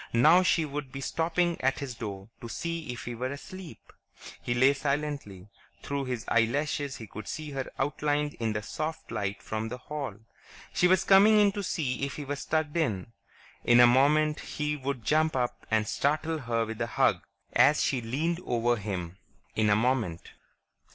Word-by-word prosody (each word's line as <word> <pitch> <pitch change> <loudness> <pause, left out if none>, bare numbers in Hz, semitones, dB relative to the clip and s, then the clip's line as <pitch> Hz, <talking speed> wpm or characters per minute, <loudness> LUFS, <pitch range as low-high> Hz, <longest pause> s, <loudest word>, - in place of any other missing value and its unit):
Now 155 +10 +6
she 170 -3 +2
would 145 -2 -5
be 135 - -6
stopping 170 +4 0
at 135 +1 +1
his 140 -3 -5
door 100 -3 -7
to 115 - -7
see 165 0 -4
if 120 - -7
he 120 - -4
were 125 +3 -3
asleep. 175 +4 -10 0.5
He 120 - -1
lay 130 +3 +5
silently; 140 -9 -3 0.3
through 140 -1 -2
his 125 -3 -4
eyelashes 140 +4 0
he 110 - -8
could 110 0 -9
see 155 -1 -5
her 135 -2 -4
outlined 145 +1 0
in 110 -2 0
the 105 0 -3
soft 155 +5 -5
light 100 0 -3
from 110 +1 -3
the 125 - -5
hall. 140 -4 -5 0.6
She 180 - +4
was 185 0 +4
coming 205 +2 +6
in 205 -1 +5
to 205 - -4
see 145 -9 -2
if 140 - -2
he 145 - -6
was 145 0 -4
tucked 155 0 0
in. 115 - -1 0.5
In 120 0 +5
a 120 - +10
moment 150 +5 +4
he 150 0 -3
would 135 -4 -4
jump 155 0 +2
up 125 -2 -2
and 110 -1 +1
startle 155 +5 0
her 115 -3 -1
with 110 +1 -6
a 115 - 0
hug, - - +2 0.3
as 145 +2 +5
she 130 -3 0
leaned 155 +9 -1
over 120 0 +1
him. 95 -3 -5 0.4
In 110 -1 +2
a 105 - +5
moment.... 110 -7 0
135 Hz, 185 wpm, -28 LUFS, 115-155 Hz, 0.6 s, a